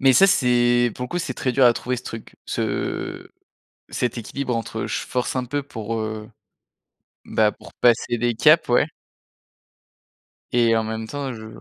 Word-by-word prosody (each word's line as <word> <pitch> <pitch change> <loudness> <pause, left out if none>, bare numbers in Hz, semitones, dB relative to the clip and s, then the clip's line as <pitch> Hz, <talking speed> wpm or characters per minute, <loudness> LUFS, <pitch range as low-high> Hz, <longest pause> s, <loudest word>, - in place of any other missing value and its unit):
mais 135 0 +6
ça, 195 +10 +7
c'est, 120 - +3
pour 125 - -4
le - - -7
coup, 175 - -2
c'est - - -3
très 130 - -1
dur 130 +1 +4
à 120 - +7
trouver 125 +2 -3
ce 120 - -7
truc, 115 -3 -8
ce - - -3 0.6
cet 125 -1 -2
équilibre 125 +2 -3
entre, 115 -1 -3
je - - -2
force 125 +1 -2
un 125 -1 -1
peu 145 +4 -2
pour, 115 -4 -5
heu, 110 0 -5 1.0
bah, 105 -1 +2
pour - - -15
passer 120 0 +2
des 120 +1 +1
caps, 155 +6 +5
ouais 120 +5 +4 1.7
et 115 -2 +4
en 110 - +1
même 110 0 -4
temps 140 -1 -4
je 110 0 -9
120 Hz, 175 wpm, -23 LUFS, 115-130 Hz, 1.7 s, ça